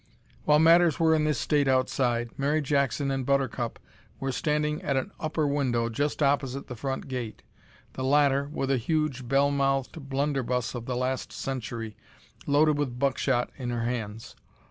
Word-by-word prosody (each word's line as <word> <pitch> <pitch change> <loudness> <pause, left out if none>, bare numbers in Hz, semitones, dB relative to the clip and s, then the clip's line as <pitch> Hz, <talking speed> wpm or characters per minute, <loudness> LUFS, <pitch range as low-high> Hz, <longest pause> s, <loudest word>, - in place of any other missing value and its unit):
While 150 - +5
matters 165 -1 +5
were 160 -1 +4
in 155 -1 +2
this 150 -3 +1
state 145 -2 +1
outside, 125 -2 +1
Mary 145 +3 +1
Jackson 140 -1 0
and 135 -1 -1
Buttercup 130 -3 0 0.4
were 135 0 -2
standing 150 +2 0
at 140 -2 0
an 165 +10 -2
upper 155 -2 -1
window 130 -5 0
just 145 +6 -1
opposite 140 -1 0
the 125 - -7
front 135 +3 -4
gate, 125 -4 -5 0.5
the 130 - -4
latter 140 0 +3
with 135 -3 -1
a 135 - +3
huge 140 -1 -1
bell 140 +2 +3
mouthed 135 +1 -1
blunderbuss 135 -4 -1
of 120 -2 -6
the 125 -1 -2
last 130 0 -2
century, 120 -4 -5 0.5
loaded 145 +1 +3
with 130 -4 -2
buckshot 135 -2 +1
in 125 -2 -3
her 120 -1 -2
hands. 115 -2 -4
135 Hz, 165 wpm, -27 LUFS, 125-145 Hz, 0.5 s, While